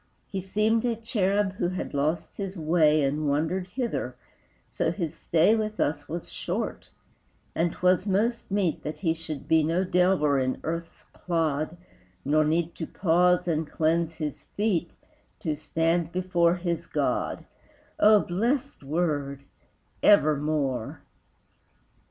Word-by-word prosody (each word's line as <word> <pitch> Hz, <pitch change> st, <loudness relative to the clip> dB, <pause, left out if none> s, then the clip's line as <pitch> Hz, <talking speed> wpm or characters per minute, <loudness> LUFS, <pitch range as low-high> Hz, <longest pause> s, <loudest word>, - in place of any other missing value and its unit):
He 195 Hz, -2 st, -4 dB
seemed 215 Hz, +4 st, +1 dB
a 240 Hz, -2 st, +1 dB
cherub 205 Hz, -3 st, 0 dB
who 175 Hz, -, 0 dB
had 185 Hz, +1 st, -4 dB
lost 155 Hz, +4 st, -1 dB
his 195 Hz, -1 st, -4 dB
way 155 Hz, -2 st, +3 dB
And 145 Hz, +2 st, 0 dB
wandered 160 Hz, +6 st, 0 dB
hither, 240 Hz, +5 st, -3 dB, 0.5 s
so -, -, -1 dB
his 165 Hz, -5 st, -3 dB
stay 165 Hz, +5 st, +3 dB
With 215 Hz, -1 st, -3 dB
us 150 Hz, -, -1 dB
was 170 Hz, +2 st, -5 dB
short, -, -, -4 dB, 0.6 s
and 170 Hz, +1 st, +1 dB
'twas 185 Hz, +2 st, +2 dB
most 220 Hz, +5 st, 0 dB
meet 195 Hz, -5 st, 0 dB
That 150 Hz, -, -5 dB
he 165 Hz, -4 st, +2 dB
should 160 Hz, -3 st, -7 dB
be 160 Hz, 0 st, +4 dB
no 165 Hz, +4 st, +1 dB
delver 180 Hz, -6 st, +3 dB
in 130 Hz, 0 st, -1 dB
earth's 165 Hz, +1 st, -5 dB
clod 160 Hz, -1 st, -1 dB, 0.5 s
Nor 155 Hz, +2 st, +3 dB
need 165 Hz, +2 st, 0 dB
to 160 Hz, -, -4 dB
pause 180 Hz, 0 st, +2 dB
and 160 Hz, -2 st, -1 dB
cleanse 165 Hz, +1 st, +1 dB
his 150 Hz, -3 st, -4 dB
feet 195 Hz, -5 st, -1 dB, 0.5 s
To 155 Hz, -2 st, -1 dB
stand 165 Hz, +2 st, 0 dB
before 175 Hz, -1 st, +2 dB
his 175 Hz, -2 st, -3 dB
God: -, -, -1 dB, 0.5 s
O 210 Hz, -1 st, +7 dB
blest 240 Hz, +10 st, -1 dB
word 145 Hz, -2 st, -1 dB, 0.6 s
Evermore! 150 Hz, -, +2 dB
170 Hz, 135 wpm, -27 LUFS, 155-190 Hz, 0.6 s, O